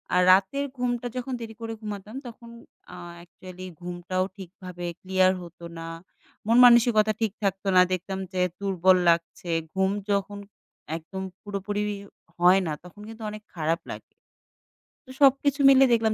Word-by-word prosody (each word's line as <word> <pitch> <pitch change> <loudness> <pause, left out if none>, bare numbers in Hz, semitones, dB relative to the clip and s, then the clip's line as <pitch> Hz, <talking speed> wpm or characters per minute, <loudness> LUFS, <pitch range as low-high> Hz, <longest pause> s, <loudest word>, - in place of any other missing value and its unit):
আ - - +4
রাতের 195 +10 +3
ঘুমটা 245 -1 -1
যখন 255 +1 -4
দেরি 225 -1 -7
করে 225 0 -4
ঘুমাতাম, 210 +1 -7
তখন 235 0 -12 0.4
আ - - -9 0.2
অ্যাকচুয়ালি 180 +1 -11
ঘুমটাও 180 +1 -3
ঠিকভাবে 180 -1 -9 0.2
ক্লিয়ার 185 0 +3
হতো 170 0 -11
না, 165 0 -7 0.6
মন 230 +2 +4
মানসিকতা 235 -3 +5
ঠিক 220 -3 +1
থাকতো 195 0 -1
না। 180 - +8
দেখতাম 190 +1 -3
যে 185 - 0 0.2
দুর্বল 190 -2 +3
লাগছে। 170 +1 0 0.2
ঘুম 190 0 +2 0.2
যখন 200 0 -1 0.6
একদম 180 +4 -8 0.2
পুরোপুরিও 205 0 -4 0.3
হয় 180 +2 +6
না, - - -2
তখন 180 +3 -14
কিন্তু 225 0 -10
অনেক 210 0 -9
খারাপ 165 0 0
লাগে। - - -6 1.1
তো - - -11
সবকিছু 280 +1 +4
মিলে 270 0 +7
দেখলাম 225 -1 +2
195 Hz, 145 wpm, -26 LUFS, 180-225 Hz, 1.1 s, না